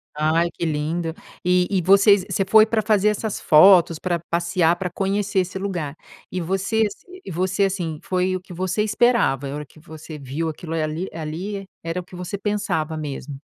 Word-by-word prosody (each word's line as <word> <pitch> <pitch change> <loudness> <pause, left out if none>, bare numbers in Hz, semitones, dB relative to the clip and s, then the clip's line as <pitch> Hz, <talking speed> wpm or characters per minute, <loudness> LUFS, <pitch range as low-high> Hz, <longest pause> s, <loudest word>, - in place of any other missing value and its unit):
Ai 160 +3 +2
que 170 - -4
lindo. 160 +2 -2 0.3
E 180 0 +3
e 190 -3 +1
vocês 200 +1 +5
você 195 - +1
foi 215 +2 +6
pra 225 -1 0
fazer 210 -1 +3
essas 210 0 -2
fotos, 170 0 +6
pra 175 -2 -1
passear, 170 0 +2
pra 180 0 -4
conhecer 200 +1 -1
esse 185 +1 -2
lugar. 175 -7 -3 0.4
E 185 - -2
você 195 +6 0
ass 200 - -9 0.3
e - - -6
você, 185 +4 +1
assim, 170 -5 -3
foi 185 0 0
o - - -2
que 180 -1 -12
você 185 +4 -1
esperava? 210 - +2
A 140 - -5
hora 150 0 -5
que 155 - -20
você 160 -1 -10
viu 140 +4 -4
aquilo, 160 +1 -7
eh, 160 - 0
ali 155 +4 -3
ali 180 +6 -5 0.2
era 165 +2 -3
o - - -6
que 180 +1 -14
você 180 +3 -5
pensava 200 -7 -2
mesmo? 145 -2 -6
180 Hz, 195 wpm, -22 LUFS, 160-195 Hz, 0.4 s, foi